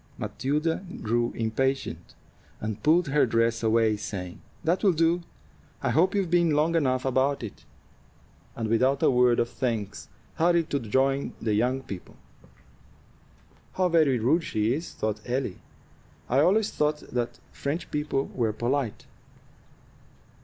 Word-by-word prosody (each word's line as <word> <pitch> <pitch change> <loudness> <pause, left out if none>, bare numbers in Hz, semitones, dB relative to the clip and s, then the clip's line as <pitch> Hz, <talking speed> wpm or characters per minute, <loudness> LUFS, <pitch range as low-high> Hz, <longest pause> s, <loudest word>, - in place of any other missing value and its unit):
Matilda 150 +6 -1 0.2
grew 120 +2 +1
impatient, 130 +4 -2 0.4
and 110 -1 -4
pulled 160 +1 +3
her 145 -1 +3
dress 115 0 +1
away, 110 -1 +3
saying, 90 -4 -6 0.2
"That 170 +5 +1
will 195 -3 +5
do; 165 +2 +2 0.6
I - - +1
hope 180 +6 +3
you've 190 -4 0
been 170 -3 +3
long 155 +3 +2
enough 130 -5 +1
about 130 +1 +1
it," 110 - -8 0.9
and 115 -1 -2
without 130 +5 +2
a - - +5
word 125 -1 +4
of 120 - +2
thanks 110 -6 -3 0.3
hurried 170 0 +2
to 140 - +1
join 135 +4 0
the 110 -2 -1
young 125 +5 +1
people. 95 -7 -9 1.6
"How 185 -1 +1
very 155 -6 +4
rude 135 +9 +2
she 110 -4 0
is!" 160 +5 -4
thought 110 0 -3
Ellie. 125 -5 -2 0.7
"I 130 - +2
always 200 +8 +3
thought 150 0 0
that 120 -1 -2
French 145 +5 -4
people 150 -2 -1
were 115 -4 0
polite." 120 +1 -2
130 Hz, 140 wpm, -27 LUFS, 115-155 Hz, 1.6 s, will